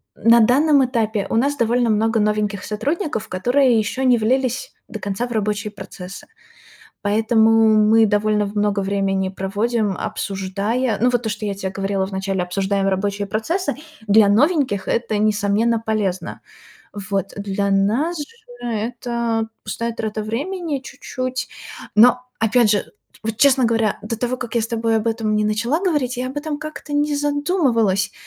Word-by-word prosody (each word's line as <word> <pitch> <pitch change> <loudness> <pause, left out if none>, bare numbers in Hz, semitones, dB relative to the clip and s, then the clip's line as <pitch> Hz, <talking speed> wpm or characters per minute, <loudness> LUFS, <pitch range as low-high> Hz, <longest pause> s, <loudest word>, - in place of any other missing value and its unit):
э, - - -19
на 230 +1 +7
данном 275 +5 +4
этапе 220 -5 -1
у - - -1
нас 280 +5 +2
довольно 240 -1 +1
много 225 +1 +1
новеньких 210 -2 0
сотрудников, 265 - -2
которые 245 +6 +2
ещё 220 +4 -1
не 250 -2 +4
влились 255 - 0
до - - -6
конца 200 +4 -3
в - - -11
рабочие 210 -1 -1
процессы. 190 -1 -9 0.8
Поэтому 220 +2 +3 0.3
мы 220 +1 +5
довольно 210 0 +1
в 200 +1 -8
много 205 -1 +1
времени 195 -1 0
проводим, 200 +2 -1
обсуждая 200 +5 -2
ну, 245 +2 +4
вот 245 -1 0
то, 225 - -2
что 210 0 -4
я 200 - -2
те 195 -1 -4
говорила 195 0 -1
в 195 - -10
начале, 190 -1 -2
обсуждаем 195 +2 -1
рабочие 200 +1 -1
процессы. 285 - -1 0.3
Для 210 +1 +6
новеньких 250 - +2
это, 230 -2 0
несомненно, 215 +2 +2
полезно. 205 -4 -2 0.5
Вот. 200 -1 -3
Для 200 0 -2
нас 225 - +1
же 295 - -3 0.4
это 230 0 -2 0.2
пустая 230 0 -3
трата 220 -1 -4
времени 295 - -3
чуть-чуть, 255 -1 -5 0.5
но, 245 +3 +6 0.2
опять 225 0 +3
же, 205 -1 +2 0.4
вот, 220 0 -2
честно 265 +1 +4
говоря, 225 -3 +1
до 220 +2 -4
того, 245 +3 -2
как 240 -2 -6
я 235 - +2
с 225 - -3
тобой 230 -1 0
об 220 +1 0
этом 225 -1 -1
не 210 0 +1
начала 230 +9 0
говорить, 295 -10 0
я 250 +1 -2
об 265 - -9
этом 295 0 -3
как-то 310 -1 -8
не 290 0 +1
задумывалась. 285 - +1
220 Hz, 160 wpm, -20 LUFS, 205-250 Hz, 0.8 s, на